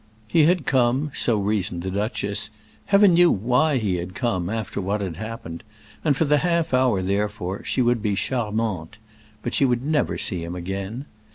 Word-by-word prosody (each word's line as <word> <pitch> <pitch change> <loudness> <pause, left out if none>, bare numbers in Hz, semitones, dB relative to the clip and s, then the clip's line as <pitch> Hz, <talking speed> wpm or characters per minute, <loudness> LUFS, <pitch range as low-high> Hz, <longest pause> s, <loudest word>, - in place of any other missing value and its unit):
He 155 +7 +4
had 175 -3 +2
come, 130 +3 +1
so 115 -3 +1
reasoned 100 -4 -1
the 95 - -3
duchess—Heaven 110 - +1
knew 175 0 +6
why 125 +8 +2
he 100 -6 0
had 90 +1 -6
come, 95 -8 -1
after 110 -2 -3
what 100 +3 -1
had 95 -5 -4
happened; 110 -6 -7 0.4
and 145 -4 +2
for 160 - +2
the 150 0 +3
half 170 -2 0
hour, 125 -7 +2
therefore, 100 -1 -2
she 130 - 0
would 120 -1 +1
be 105 -2 0
charmante. 110 -8 -2 0.5
But 120 - -3
she - - +2
would 125 -1 +1
never 150 0 0
see 90 -4 0
him 85 +1 -6
again. 95 +8 -5
110 Hz, 175 wpm, -23 LUFS, 95-130 Hz, 0.5 s, knew